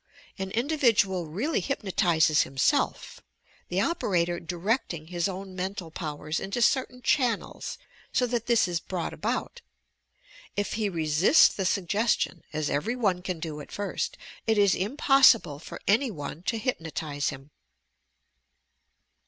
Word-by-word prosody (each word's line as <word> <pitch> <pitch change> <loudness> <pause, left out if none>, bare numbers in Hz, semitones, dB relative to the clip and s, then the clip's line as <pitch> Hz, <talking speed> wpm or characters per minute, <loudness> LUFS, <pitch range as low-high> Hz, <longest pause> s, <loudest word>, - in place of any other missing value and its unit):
An 190 0 -3
individual 225 - +2
really 220 - -1
hypno 235 -8 -3
tizes 160 -5 +3
himself, 135 -1 0 0.5
the 180 - 0
operator 175 - 0
directing 175 - -2
his 175 +1 -1
own 190 0 -7
mental 185 -2 -4
powers 155 -1 -4
into 200 +5 -3
certain 250 0 +1
channels 245 -6 0 0.3
so 250 - +2
that 240 -2 -2
this 235 -5 +4
is 175 -1 -1
brought 180 -2 -4
about. - - -3 0.9
If 205 0 -1
he 215 -2 0
resists 165 - +5
the 190 - -3
suggestion, 200 -1 0
as 155 -1 -2
every 160 +14 -1
one 195 -7 +1
can 180 -2 -4
do 155 -2 -5
at - - -12
first, 205 0 -3 0.3
it 220 -1 +3
is 200 -2 +5
impossible 235 - +4
for - - -9
any 235 +6 +3
one 150 -4 -6
to 230 - -1
hypnotize 160 - -2
him. 135 +2 -9
190 Hz, 135 wpm, -27 LUFS, 165-230 Hz, 0.9 s, resists